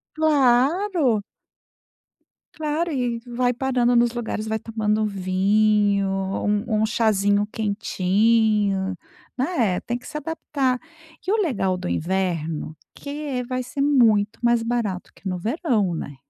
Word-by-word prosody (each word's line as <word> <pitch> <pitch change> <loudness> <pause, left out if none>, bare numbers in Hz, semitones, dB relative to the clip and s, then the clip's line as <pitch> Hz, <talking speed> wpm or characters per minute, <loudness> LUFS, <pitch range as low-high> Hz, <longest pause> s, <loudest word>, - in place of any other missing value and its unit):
Claro. 290 - +3 1.3
Claro, 315 +2 -1
e 245 -5 -1
e - - -8 0.2
vai 250 0 +2
parando 245 -1 +1
nos 235 0 +3
lugares, 220 -2 -4
vai 220 0 0
tomando 215 -1 -1
vinho, 200 +1 +2
um 205 +3 -1
um - - +4
chazinho 205 -2 +2
quentinho, 205 -1 +1 0.4
né. 250 - 0
Tem 240 0 -3
que 250 - -13
se - - -11
adaptar. 280 -4 -1 0.4
Que 390 - -1
o - - +4
legal 195 - 0
do 180 - -5
inverno, 165 - -2 0.2
que 285 - -10
é 285 -4 -3
vai 255 +1 -3
ser 265 +3 -4
muito 225 -7 +3
mais 235 -1 +3
barato 230 -6 -2
que 195 - -9
no 180 -1 -2
verão, 220 - 0
né. 145 -3 -5
220 Hz, 135 wpm, -23 LUFS, 200-255 Hz, 1.3 s, um